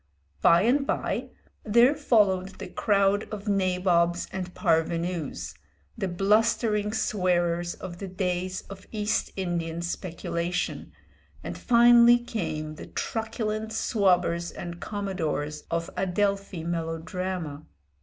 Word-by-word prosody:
By 170 +2 +6
and 275 +5 +2
by, - - -1 0.3
there 235 +5 +5
followed 200 -10 +2
the - - -6
crowd 200 0 +1
of 210 0 -6
nabobs 180 -3 +2
and 185 -1 -4
parvenus, 165 -1 -1 0.4
the 210 -5 -2
blustering 210 +3 +2
swearers 175 -4 0
of 175 -2 -8
the 195 - -5
days 185 0 -2
of 195 -1 -11
East 210 -1 -1
Indian 170 -3 -2
speculation, 175 0 -3 0.5
and - - -5
finally 240 0 +6
came 155 -10 -4
the - - -9
truculent 220 -1 -3
swabbers 180 -6 +1
and 175 0 -7
commodores 165 -7 -3
of 165 0 -2
Adelphi 195 -1 -1
melodrama. 165 -1 -4
185 Hz, 105 wpm, -27 LUFS, 170-210 Hz, 0.5 s, By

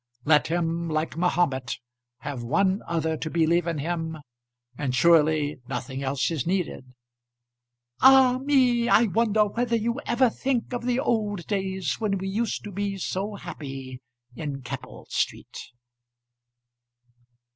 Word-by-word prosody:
Let 150 -1 +4
him, 170 0 -1
like 155 0 -1
Mahomet, 155 -8 0 0.4
have 140 -4 -5
one 190 - +1
other 160 -1 0
to 160 - -4
believe 170 +1 +2
in 165 -2 -1
him, 160 +1 -3 0.6
and 130 -2 -2
surely 155 -2 +3
nothing 130 +1 -4
else 140 +2 0
is 155 -4 -2
needed. 170 -9 -2 1.1
"Ah 260 -1 +7
me! 255 -4 +3
I 230 - +6
wonder 215 0 +2
whether 235 +3 -1
you 235 +4 -1
ever 255 +2 +4
think 260 -1 -2
of 245 0 -3
the 250 0 +1
old 210 -8 -1
days 190 -7 -2
when 205 -3 0
we 190 +1 -4
used 220 +2 -2
to 210 - -7
be 200 +1 -3
so 195 +3 -3
happy 135 -8 -8 0.3
in 140 -3 -5
Keppel 125 - -8
Street?" - - -2
175 Hz, 135 wpm, -26 LUFS, 150-215 Hz, 1.1 s, Ah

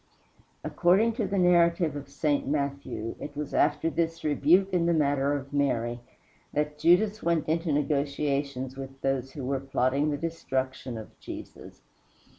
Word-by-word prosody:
According 195 +7 +3
to 215 - 0
the 195 +1 -1
narrative 170 -3 +3
of 140 -1 -7
St. 145 0 0
Matthew, 140 -5 -2
it 145 0 -8
was 150 -1 -4
after 150 +1 +2
this 165 0 -1
rebuke 165 +6 +3
in 170 -2 +2
the 170 - +3
matter 140 -2 +2
of 140 0 -5
Mary 120 -4 0 0.5
that 150 0 -1
Judas 205 +5 +3
went 170 -2 0
into 165 +1 0
negotiations 140 -2 -1
with 135 0 -8
those 135 -1 -1
who 140 -4 -6
were 135 +1 0
plotting 135 +2 0
the 145 - -1
destruction 130 -6 -3
of 110 - -11
Jesus. - - -10
145 Hz, 150 wpm, -28 LUFS, 135-165 Hz, 0.5 s, According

